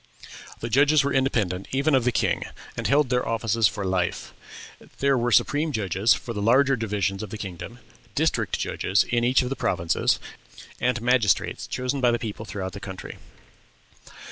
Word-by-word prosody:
The 115 - -3
judges 145 +4 +4
were 140 0 -1
independent 105 -9 0
even 140 +3 +1
of 130 -3 +3
the 125 - +3
king, - - 0 0.3
and - - -2
held 145 -1 +3
their 125 0 +1
offices 115 -1 +2
for 105 -2 -4
life. 95 -2 -2 0.6
There 140 0 +2
were 120 -1 0
supreme 150 +7 +2
judges 105 -2 +2
for 120 - -6
the 105 - -4
larger 135 +6 +4
divisions 105 -4 -2
of 110 - -6
the 110 - -6
kingdom, 95 +4 -7 0.4
district - - 0
judges 95 +2 +1
in 120 -1 -1
each 125 +2 +3
of 125 - -3
the 135 - -2
provinces, 85 -8 +1 0.6
and 125 0 +1
magistrates 120 -7 +1
chosen 130 +2 -2
by 125 - +4
the 120 - +2
people 110 -1 -6
throughout 95 -2 -5
the 100 - -7
country. 95 -2 -8
115 Hz, 170 wpm, -25 LUFS, 100-130 Hz, 0.6 s, judges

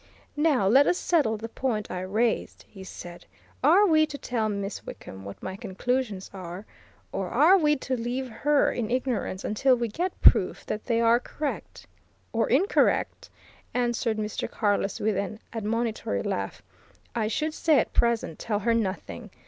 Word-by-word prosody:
"Now 295 -9 +2
let 265 +8 +6
us 355 - +2
settle 280 -11 +1
the 225 +2 -6
point 225 -3 -2
I 180 - -3
raised," 220 +5 -1
he 190 -2 -12
said. 175 -2 -10 0.4
"Are 350 +9 +6
we 310 -4 +4
to 290 - -7
tell 230 -5 -1
Miss 200 -1 -4
Wickham 95 0 -9
what 100 - -9
my 190 - -4
conclusions 210 +1 -2
are, 185 +1 -7 0.5
or 190 -2 -3
are 310 +10 +6
we 300 -5 +3
to 265 -1 -3
leave 250 +2 -3
her 290 +5 +2
in 225 -3 -3
ignorance 245 -6 -2
until 255 +5 +3
we 240 -1 -1
get 350 - -3
proof - - +4
that 215 - -4
they 230 -2 +1
are 230 +1 +5
correct?" 295 +3 -5 0.5
"Or 225 0 +1
incorrect!" 360 - +2 0.5
answered 240 -2 0
Mr. 215 0 -3
Carless 205 -2 0
with 215 -1 0
an 200 +2 -3
admonitory 220 - -2
laugh. 95 -1 -3 0.5
"I 215 - 0
should 305 +7 -1
say 315 -2 +3
at - - +1
present, 235 -9 +1
tell 210 -2 -1
her 230 +3 +1
nothing. 205 -4 -3
230 Hz, 165 wpm, -26 LUFS, 205-265 Hz, 0.5 s, let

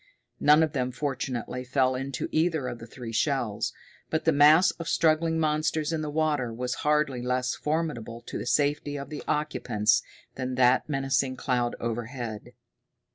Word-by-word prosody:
None 150 +2 +6
of 155 - -1
them, 130 -2 -1
fortunately, 125 -2 -3
fell 130 0 +1
into 135 +1 -3
either 160 -4 +1
of 120 - -5
the 115 - -10
three 120 -1 -8
shells, 120 -4 0 0.4
but 160 - -1
the 165 - +5
mass 150 +4 +6
of 165 0 -4
struggling 160 0 +2
monsters 155 0 0
in 160 - -1
the 155 - -3
water 150 -5 0
was 125 +2 -3
hardly 150 -4 +1
less 125 0 0
formidable 150 -8 -3
to - - -6
the - - -5
safety 145 0 +1
of 140 +2 -7
the 150 - -5
occupants 115 -7 +1 0.3
than 130 -1 -4
that 125 +3 +3
menacing 135 -2 0
cloud 125 -2 -1
overhead. 115 -1 -5
135 Hz, 160 wpm, -27 LUFS, 125-150 Hz, 0.4 s, None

